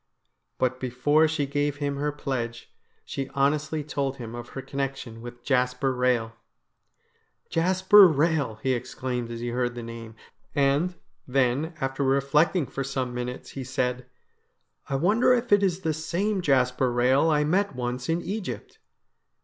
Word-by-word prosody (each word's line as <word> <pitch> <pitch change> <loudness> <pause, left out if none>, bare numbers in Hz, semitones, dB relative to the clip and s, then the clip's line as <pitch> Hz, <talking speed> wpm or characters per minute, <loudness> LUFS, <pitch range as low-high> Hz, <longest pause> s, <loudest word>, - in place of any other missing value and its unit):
But 130 0 0
before 140 +5 +2
she 155 -2 -1
gave 145 +1 -1
him 145 -1 -2
her 150 +1 -1
pledge, 125 -5 -4 0.3
she 135 -1 -4
honestly 150 +2 +1
told 140 -2 -2
him 115 -3 -7
of 120 0 -7
her - - -2
connection 135 -4 -4
with 120 0 -10
Jasper 125 0 +1
Rehel. 125 -3 +1 0.6
' - - -44
Jasper 185 +4 +6
Rehel! 150 -6 +1
' - - -27
he 130 -1 +2
exclaimed 125 0 -3
as 115 0 -6
he 120 - -2
heard 120 0 -1
the 120 - -6
name; 115 -1 -8 0.4
and, 145 +5 +2 0.3
then, 135 +5 +1
after 135 +1 -1
reflecting 140 +5 +2
for 135 - -4
some 130 -2 -3
minutes, 125 +1 -5
he 135 - -6
said: 125 -1 -2 0.4
' - - -32
I 135 - 0
wonder 210 - +4
if 240 -1 -3
it 205 0 +6
is 190 -2 +1
the 160 -3 0
same 185 +6 -1
Jasper 130 -4 +2
Rehel 130 +6 +3
I 150 -1 +3
met 185 +2 +1
once 125 +1 -3
in 165 +2 0
Egypt 185 - -5
135 Hz, 160 wpm, -26 LUFS, 125-155 Hz, 0.6 s, Jasper